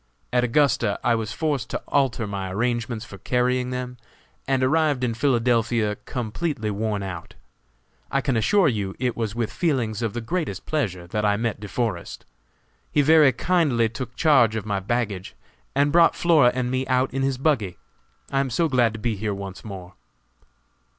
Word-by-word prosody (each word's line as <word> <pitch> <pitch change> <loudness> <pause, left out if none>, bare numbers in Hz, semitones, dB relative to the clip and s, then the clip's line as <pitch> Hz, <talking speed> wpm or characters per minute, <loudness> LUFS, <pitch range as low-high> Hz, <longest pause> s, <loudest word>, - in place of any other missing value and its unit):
At 125 - +3
Augusta 120 -4 +2
I 120 -1 +3
was 115 -1 -2
forced 145 -6 -2
to - - -3
alter 130 -5 +1
my 100 -2 -4
arrangements 120 +1 -2
for 95 -3 -11
carrying 125 +3 0
them, 125 0 -5 0.5
and 135 -1 +1
arrived 145 -1 +2
in 120 -2 0
Philadelphia 115 -3 +1
completely 120 -1 -3
worn 105 -1 -2
out. 90 -3 -7 0.7
I 135 - +1
can 135 -2 0
assure 170 - +3
you 100 -7 -1
it 125 -2 -1
was 110 -2 -3
with 115 -1 -2
feelings 120 - 0
of 115 -3 -1
the 120 - -3
greatest 145 - -3
pleasure 95 - -2
that 105 +5 -3
I 105 -1 +2
met 115 -1 -2
De 105 - -7
Forest. 105 -3 -3 0.7
He 145 - +3
very 155 -2 +6
kindly 140 -10 +1
took 125 +2 -7
charge 130 -9 +4
of 110 - -3
my 100 -2 -1
baggage, 100 - -3 0.4
and 140 +1 +3
brought 170 +1 +5
Flora 155 -8 +4
and 125 -1 -1
me 130 0 -1
out 130 0 +1
in 135 - -1
his 135 -1 0
buggy. 125 - 0 0.5
I 135 - +1
am 135 -1 0
so 165 +8 +1
glad 125 -6 +2
to 110 - -7
be 115 0 -1
here 105 0 -2
once 95 -1 -8
more." 95 -4 -9
120 Hz, 175 wpm, -24 LUFS, 105-135 Hz, 0.7 s, very